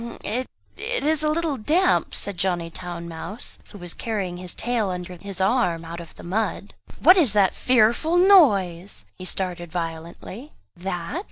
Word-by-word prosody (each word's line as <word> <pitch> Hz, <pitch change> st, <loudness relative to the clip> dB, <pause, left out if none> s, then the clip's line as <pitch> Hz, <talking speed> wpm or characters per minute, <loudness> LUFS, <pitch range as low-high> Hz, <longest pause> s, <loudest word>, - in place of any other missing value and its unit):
it 250 Hz, +5 st, -2 dB, 0.3 s
is 315 Hz, -11 st, +1 dB
a 305 Hz, -, +2 dB
little 310 Hz, -2 st, 0 dB
damp," 330 Hz, -, +2 dB
said 200 Hz, -, -1 dB
Johnny 175 Hz, -2 st, -1 dB
Town 175 Hz, -1 st, -6 dB
mouse, 170 Hz, +7 st, -7 dB
who 205 Hz, -, -11 dB
was 175 Hz, -3 st, -4 dB
carrying 195 Hz, -6 st, -3 dB
his 180 Hz, -1 st, -4 dB
tail 235 Hz, -4 st, 0 dB
under 180 Hz, 0 st, -5 dB
his 195 Hz, +1 st, -8 dB
arm, 185 Hz, -5 st, +1 dB
out 170 Hz, +1 st, -7 dB
of 170 Hz, -1 st, -11 dB
the -, -, -12 dB
mud. 210 Hz, +6 st, -2 dB, 0.3 s
"What 365 Hz, -, +8 dB
is 290 Hz, -, +4 dB
that 200 Hz, -3 st, +4 dB
fearful 250 Hz, +7 st, +3 dB
noise?" 205 Hz, -, +4 dB
he 185 Hz, -, -7 dB
started 175 Hz, -2 st, -3 dB
violently. 170 Hz, -, -6 dB, 0.2 s
"That?" 180 Hz, -, -4 dB
195 Hz, 160 wpm, -24 LUFS, 175-255 Hz, 0.3 s, What